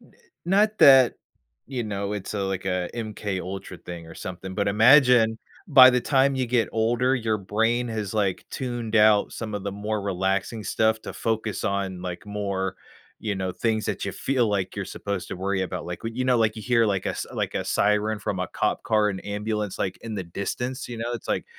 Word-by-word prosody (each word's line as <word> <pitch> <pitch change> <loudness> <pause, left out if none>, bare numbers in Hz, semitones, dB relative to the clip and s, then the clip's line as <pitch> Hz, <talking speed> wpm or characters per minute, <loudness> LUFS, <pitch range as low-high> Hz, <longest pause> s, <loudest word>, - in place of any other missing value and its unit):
n - - -22 0.3
not 210 +4 +2
that, 135 -3 +7 0.5
you 125 -3 -3
know, 100 -1 -3
it's 105 0 -5
a 100 - -1
like, 95 -1 -3
a 90 -1 -1
MK 105 -4 -4
Ultra 95 +2 -7
thing 85 -2 -9
or 80 - -11
something, 95 +1 -7
but 100 0 0
imagine 115 0 +5 0.3
by 130 -3 +9
the 125 0 +2
time 135 +1 +2
you 130 -1 -1
get 115 -1 +1
older, 120 +3 +2
your 115 -4 0
brain 115 +5 0
has, 110 -3 -4
like, 100 -3 0
tuned 120 -4 -3
out 105 -1 +5
some 110 -2 -5
of 100 - -3
the 100 - -3
more 105 +1 -3
relaxing 100 +3 -1
stuff 110 +1 +1
to - - -6
focus 110 -2 -2
on, 100 -2 -2
like, 90 +1 -6
more, 100 -2 -3 0.4
you 105 -2 -2
know, 95 -1 -3
things 110 +2 -1
that - - -3
ya - - -3
feel 125 -5 +1
like 100 -3 -1
you're 100 - -2
supposed 100 -2 -4
to - - -5
worry 95 +1 -1
about. 90 -1 -4
Like, 90 -1 -6
when 115 - -4
you 130 - 0
know, 125 -2 +3
like, 110 -1 +3
w 110 -1 -9
you - - -11
hear, 115 -2 +4
like, 100 -3 0
a - - +1
s - - -4
like, - - -2
a - - -1
siren 105 +1 +1
from 95 -3 -3
a 90 - -2
cop - - -1
car, 105 -2 +2
an 95 - -5
ambulance, 105 0 -3
like, 95 -1 -2
in 115 -1 -5
the 95 -3 -4
distance, 125 +9 -4
you 120 - -6
know, 120 +1 -3
it's 115 - -7
like, - - 0
105 Hz, 220 wpm, -25 LUFS, 95-115 Hz, 0.5 s, by